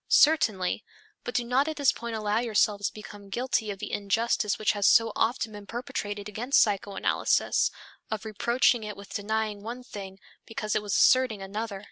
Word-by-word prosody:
Certainly, 220 Hz, -, +3 dB, 0.4 s
but 245 Hz, -, -6 dB
do 245 Hz, -, +2 dB
not 255 Hz, +5 st, +1 dB
at 315 Hz, -, -2 dB
this 280 Hz, -3 st, +3 dB
point 235 Hz, -2 st, -6 dB
allow 215 Hz, 0 st, 0 dB
yourselves 210 Hz, -3 st, +1 dB
to -, -, -7 dB
become 205 Hz, -1 st, -11 dB
guilty 240 Hz, 0 st, -1 dB
of 200 Hz, -, -4 dB
the 210 Hz, -, -6 dB
injustice 210 Hz, +1 st, 0 dB
which 215 Hz, -, +2 dB
has 205 Hz, -1 st, +1 dB
so 225 Hz, -1 st, +5 dB
often 225 Hz, -1 st, 0 dB
been 205 Hz, -1 st, -10 dB
perpetrated 205 Hz, -3 st, -4 dB
against 235 Hz, +6 st, +1 dB
psychoanalysis, 200 Hz, -2 st, +1 dB, 0.4 s
of 220 Hz, 0 st, -4 dB
reproaching 235 Hz, +2 st, +2 dB
it 210 Hz, -1 st, -6 dB
with 200 Hz, 0 st, -11 dB
denying 215 Hz, 0 st, -2 dB
one 240 Hz, +4 st, -7 dB
thing 195 Hz, -5 st, -9 dB, 0.3 s
because 215 Hz, -1 st, -3 dB
it -, -, +1 dB
was 205 Hz, -1 st, -2 dB
asserting 255 Hz, -5 st, +4 dB
another. 205 Hz, +1 st, -4 dB
215 Hz, 175 wpm, -27 LUFS, 205-235 Hz, 0.4 s, so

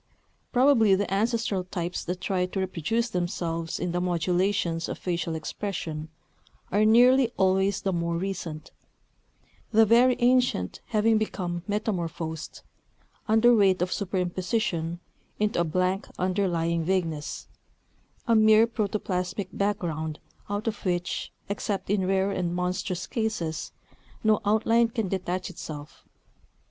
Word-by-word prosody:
Probably 245 Hz, -6 st, +5 dB
the 195 Hz, 0 st, -1 dB
ancestral 220 Hz, -2 st, 0 dB
types 175 Hz, -1 st, -4 dB
that 180 Hz, +1 st, -4 dB
try 180 Hz, -2 st, 0 dB
to 190 Hz, -, -4 dB
reproduce 190 Hz, +6 st, -1 dB
themselves 170 Hz, -3 st, -2 dB
in 175 Hz, 0 st, -2 dB
the 175 Hz, +1 st, -1 dB
modulations 180 Hz, 0 st, 0 dB
of -, -, -4 dB
facial 170 Hz, -2 st, -2 dB
expression, 160 Hz, -2 st, -4 dB, 0.6 s
are 210 Hz, +2 st, +3 dB
nearly 245 Hz, +2 st, +6 dB
always 190 Hz, +1 st, +2 dB
the 195 Hz, -, 0 dB
more 170 Hz, 0 st, -1 dB
recent; 170 Hz, -4 st, -5 dB, 1.0 s
the 225 Hz, 0 st, +5 dB
very 240 Hz, +3 st, +5 dB
ancient 245 Hz, -, +2 dB
having 220 Hz, 0 st, +3 dB
become 175 Hz, -5 st, -3 dB
metamorphosed, 170 Hz, -7 st, -3 dB, 0.6 s
under 225 Hz, +2 st, +5 dB
weight 195 Hz, -3 st, +4 dB
of 180 Hz, -, -3 dB
superimposition, 185 Hz, -2 st, -1 dB, 0.4 s
into 210 Hz, -4 st, 0 dB
a -, -, +4 dB
blank 185 Hz, +4 st, 0 dB
underlying 175 Hz, -3 st, 0 dB
vagueness, 165 Hz, -4 st, -2 dB, 0.8 s
a 230 Hz, -, +4 dB
mere 220 Hz, 0 st, +6 dB
protoplasmic 200 Hz, -4 st, -2 dB
background 165 Hz, -6 st, -2 dB, 0.3 s
out 205 Hz, +2 st, -3 dB
of 220 Hz, -2 st, -3 dB
which, 175 Hz, -1 st, -2 dB, 0.2 s
except 200 Hz, -1 st, -3 dB
in 195 Hz, -3 st, +1 dB
rare 195 Hz, +1 st, +2 dB
and 175 Hz, -2 st, -2 dB
monstrous 180 Hz, 0 st, -2 dB
cases, 215 Hz, -9 st, -3 dB, 0.5 s
no 215 Hz, -1 st, +3 dB
outline 225 Hz, +3 st, +3 dB
can 225 Hz, -4 st, -3 dB
detach 185 Hz, 0 st, -2 dB
itself. 150 Hz, -3 st, -9 dB
190 Hz, 120 wpm, -27 LUFS, 175-215 Hz, 1.0 s, nearly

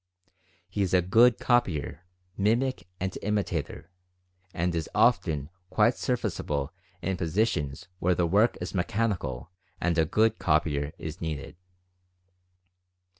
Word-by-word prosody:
He 100 Hz, +3 st, -3 dB
is 95 Hz, -1 st, +2 dB
a 90 Hz, -, +4 dB
good 115 Hz, +6 st, +5 dB
copyer, 90 Hz, -, 0 dB, 0.3 s
mimic, 115 Hz, -1 st, +1 dB
and 95 Hz, 0 st, -3 dB
imitator, 90 Hz, -6 st, -2 dB, 0.6 s
and 85 Hz, 0 st, -1 dB
is 80 Hz, -1 st, -2 dB
often 85 Hz, -, +2 dB, 0.2 s
quite 110 Hz, +4 st, +4 dB
service 125 Hz, -1 st, -2 dB
able 70 Hz, +1 st, -2 dB, 0.3 s
in 95 Hz, 0 st, -1 dB
positions 85 Hz, -5 st, -1 dB
where 90 Hz, 0 st, +2 dB
the 90 Hz, -, +2 dB
work 105 Hz, +7 st, +3 dB
is 90 Hz, -, -5 dB
mechanical 90 Hz, -, -1 dB, 0.3 s
and 90 Hz, -1 st, +1 dB
a 80 Hz, -, +4 dB
"good 110 Hz, +6 st, +2 dB
copyer" 75 Hz, -1 st, +1 dB
is 80 Hz, +2 st, -7 dB
needed. 80 Hz, -2 st, -4 dB
90 Hz, 125 wpm, -28 LUFS, 80-105 Hz, 0.6 s, good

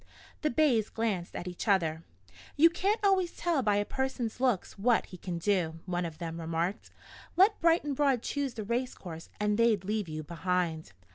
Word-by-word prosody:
The 305 Hz, -, +1 dB
bays 240 Hz, -6 st, +2 dB
glanced 210 Hz, -6 st, -2 dB
at 175 Hz, -, -5 dB
each 180 Hz, +5 st, -6 dB
other. 165 Hz, -6 st, +2 dB, 0.5 s
"You 330 Hz, +3 st, +6 dB
can't 400 Hz, +5 st, +1 dB
always 380 Hz, -3 st, +2 dB
tell 335 Hz, -5 st, +1 dB
by 210 Hz, -4 st, +2 dB
a 205 Hz, 0 st, +1 dB
person's 265 Hz, -3 st, -3 dB
looks 250 Hz, -7 st, 0 dB
what 235 Hz, +2 st, +3 dB
he 185 Hz, -, -11 dB
can 175 Hz, 0 st, -4 dB
do," 170 Hz, -3 st, 0 dB
one 180 Hz, -1 st, -1 dB
of 160 Hz, -2 st, -6 dB
them 165 Hz, 0 st, -5 dB
remarked. 165 Hz, +4 st, -2 dB, 0.5 s
"Let 400 Hz, +4 st, +5 dB
Bright 335 Hz, 0 st, +4 dB
and 290 Hz, -2 st, -2 dB
Broad 270 Hz, -4 st, +2 dB
choose 280 Hz, -3 st, -2 dB
the 220 Hz, -, -4 dB
race 240 Hz, +4 st, -2 dB
course 165 Hz, -3 st, -9 dB
and 210 Hz, +1 st, +1 dB
they'd 225 Hz, -5 st, +3 dB
leave 210 Hz, -3 st, -1 dB
you 155 Hz, 0 st, -5 dB
behind." 170 Hz, -, -2 dB
210 Hz, 190 wpm, -30 LUFS, 175-265 Hz, 0.5 s, You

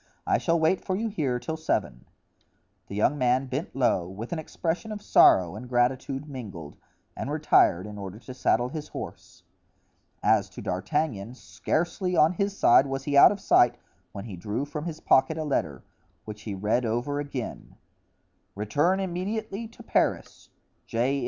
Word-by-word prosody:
I -, -, +2 dB
shall 170 Hz, -1 st, +1 dB
wait 160 Hz, +4 st, +2 dB
for 185 Hz, -, -1 dB
you 225 Hz, +3 st, -1 dB
here 140 Hz, -11 st, -1 dB
till 160 Hz, +6 st, -5 dB
seven." -, -, -2 dB, 0.8 s
The 100 Hz, -, -7 dB
young 130 Hz, +8 st, +2 dB
man 125 Hz, +1 st, +2 dB
bent 135 Hz, +5 st, -4 dB
low, 105 Hz, -9 st, +1 dB
with 110 Hz, -, -6 dB
an 165 Hz, -, -2 dB
expression 170 Hz, +6 st, -3 dB
of 210 Hz, -, -5 dB
sorrow 90 Hz, -, +5 dB
and 120 Hz, +4 st, -8 dB
gratitude 130 Hz, +3 st, 0 dB
mingled, 100 Hz, -, -8 dB, 0.4 s
and -, -, -4 dB
retired 90 Hz, +3 st, +3 dB
in 105 Hz, -1 st, -8 dB
order 100 Hz, 0 st, -7 dB
to 125 Hz, +3 st, -10 dB
saddle 125 Hz, -1 st, +1 dB
his 155 Hz, 0 st, -6 dB
horse. -, -, -9 dB, 0.8 s
As -, -, +3 dB
to -, -, -10 dB
D'Artagnan, 115 Hz, -, -2 dB
scarcely, 175 Hz, +6 st, -2 dB
on 155 Hz, +3 st, +5 dB
his 200 Hz, +2 st, -2 dB
side, 135 Hz, +3 st, +5 dB
was 135 Hz, 0 st, -3 dB
he 145 Hz, 0 st, -2 dB
out 140 Hz, -, +9 dB
of 205 Hz, -, -4 dB
sight 120 Hz, -9 st, +4 dB, 0.3 s
when 100 Hz, -, -7 dB
he 105 Hz, -5 st, -7 dB
drew 105 Hz, +9 st, -3 dB
from 150 Hz, +2 st, -6 dB
his 160 Hz, -2 st, -5 dB
pocket 135 Hz, +4 st, +3 dB
a 160 Hz, -, -2 dB
letter, 80 Hz, -, -2 dB, 0.4 s
which 105 Hz, -1 st, -8 dB
he 100 Hz, -, -3 dB
read 105 Hz, +6 st, 0 dB
over 120 Hz, +5 st, -1 dB
again: 140 Hz, -5 st, -6 dB, 0.8 s
"Return 145 Hz, -, +1 dB
immediately 200 Hz, +4 st, -3 dB
to 230 Hz, -, -15 dB
Paris.—J. 130 Hz, +5 st, -2 dB
135 Hz, 165 wpm, -26 LUFS, 110-160 Hz, 0.8 s, out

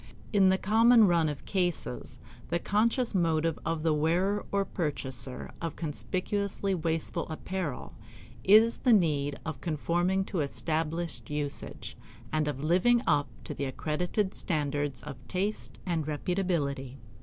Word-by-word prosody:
In 195 Hz, -2 st, +6 dB
the 190 Hz, -, +4 dB
common 225 Hz, +3 st, +6 dB
run 170 Hz, -3 st, +3 dB
of 140 Hz, -4 st, -6 dB
cases 175 Hz, -9 st, -2 dB, 0.3 s
the 170 Hz, -, +1 dB
conscious 225 Hz, +7 st, +1 dB
motive 165 Hz, -3 st, +1 dB
of 160 Hz, -1 st, -2 dB
the 160 Hz, -2 st, +3 dB
wearer 175 Hz, +7 st, +1 dB
or 200 Hz, 0 st, +1 dB
purchaser 135 Hz, -7 st, -4 dB
of 165 Hz, -3 st, -3 dB
conspicuously 195 Hz, +5 st, -2 dB
wasteful 165 Hz, 0 st, -1 dB
apparel 160 Hz, -2 st, -4 dB, 0.5 s
is 220 Hz, +4 st, +6 dB
the 250 Hz, -, +4 dB
need 145 Hz, -7 st, +2 dB
of 155 Hz, -5 st, -5 dB
conforming 175 Hz, +4 st, 0 dB
to 185 Hz, -, -3 dB
established 160 Hz, +3 st, -2 dB
usage, 150 Hz, -1 st, -4 dB, 0.4 s
and 155 Hz, -1 st, +1 dB
of 145 Hz, -1 st, -3 dB
living 210 Hz, +10 st, +4 dB
up 145 Hz, -1 st, +3 dB, 0.2 s
to -, -, -5 dB
the 140 Hz, -, -3 dB
accredited 175 Hz, -, -1 dB
standard 145 Hz, -3 st, -1 dB
of 145 Hz, -3 st, -7 dB
taste 195 Hz, +3 st, -2 dB
and 165 Hz, -5 st, -1 dB
reputability. 150 Hz, -5 st, -1 dB
165 Hz, 130 wpm, -29 LUFS, 150-190 Hz, 0.5 s, In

